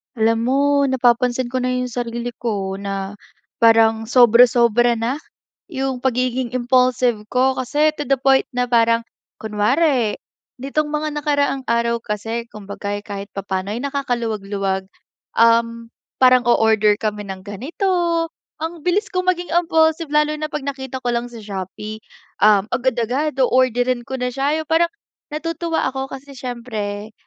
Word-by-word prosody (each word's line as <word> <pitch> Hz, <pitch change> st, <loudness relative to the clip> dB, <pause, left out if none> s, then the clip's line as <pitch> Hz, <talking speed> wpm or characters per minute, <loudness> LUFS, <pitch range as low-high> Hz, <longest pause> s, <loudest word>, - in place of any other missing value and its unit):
Alam 225 Hz, 0 st, +2 dB
mo 265 Hz, +2 st, +2 dB, 0.3 s
napapansin 250 Hz, -1 st, +1 dB
ko 255 Hz, -, 0 dB
na 255 Hz, -, -1 dB
'yong 250 Hz, 0 st, -2 dB
sarili 240 Hz, 0 st, -4 dB
ko 195 Hz, -4 st, -3 dB
na 195 Hz, 0 st, -5 dB, 0.4 s
parang 225 Hz, -1 st, +4 dB
sobra-sobra 240 Hz, 0 st, +5 dB
na 235 Hz, +5 st, -2 dB, 0.5 s
'yong 270 Hz, -5 st, -3 dB
pagiging 250 Hz, -1 st, -1 dB
impulsive 250 Hz, -3 st, +2 dB
ko 260 Hz, +3 st, +1 dB
kasi 295 Hz, +4 st, +2 dB
to 295 Hz, -, -3 dB
the 275 Hz, -, +3 dB
point 270 Hz, 0 st, +3 dB
na 250 Hz, 0 st, 0 dB
parang 230 Hz, -1 st, +3 dB, 0.4 s
kunwari 225 Hz, +3 st, +1 dB, 0.5 s
nitong 295 Hz, +3 st, -1 dB
mga 305 Hz, 0 st, -2 dB
nakaraang 285 Hz, -2 st, 0 dB
araw 235 Hz, 0 st, +1 dB
kasi 225 Hz, +2 st, -4 dB
kumbaga, 205 Hz, -1 st, -6 dB
eh, 205 Hz, -, -9 dB
kahit 200 Hz, -1 st, -6 dB
papano, 195 Hz, -1 st, -3 dB
eh, 210 Hz, -, -3 dB
nakakaluwag-luwag, 210 Hz, -8 st, -2 dB, 0.5 s
um, 230 Hz, 0 st, +3 dB, 0.3 s
parang 255 Hz, -1 st, +6 dB
o-order 220 Hz, -3 st, +4 dB
kami 210 Hz, -2 st, -3 dB
ng 190 Hz, +1 st, -7 dB
ganito. 255 Hz, -, -5 dB, 0.7 s
Ang 325 Hz, 0 st, -5 dB
bilis 370 Hz, +6 st, +1 dB
ko 365 Hz, -, +1 dB
maging 360 Hz, -1 st, -1 dB
impulsive 325 Hz, -2 st, +2 dB
lalo 300 Hz, 0 st, +2 dB
na 305 Hz, 0 st, -4 dB
'pag 300 Hz, -2 st, -5 dB
nakita 265 Hz, -2 st, -5 dB
ko 245 Hz, -, +1 dB
lang 240 Hz, +1 st, -2 dB
sa 235 Hz, -, -11 dB
Shopee. 205 Hz, +2 st, -6 dB, 0.4 s
Um, 205 Hz, -2 st, +5 dB
agad-agad 260 Hz, +3 st, 0 dB
o-orderin 255 Hz, -1 st, +2 dB
ko 265 Hz, -, -4 dB
na 250 Hz, 0 st, -2 dB
siya 280 Hz, +4 st, 0 dB
yung -, -, -9 dB
parang 335 Hz, +1 st, +3 dB, 0.4 s
natutuwa 330 Hz, +2 st, -2 dB
ako 265 Hz, 0 st, -4 dB
kasi 275 Hz, +1 st, -9 dB
siyempre, 220 Hz, -5 st, -5 dB
245 Hz, 145 wpm, -20 LUFS, 220-270 Hz, 0.7 s, parang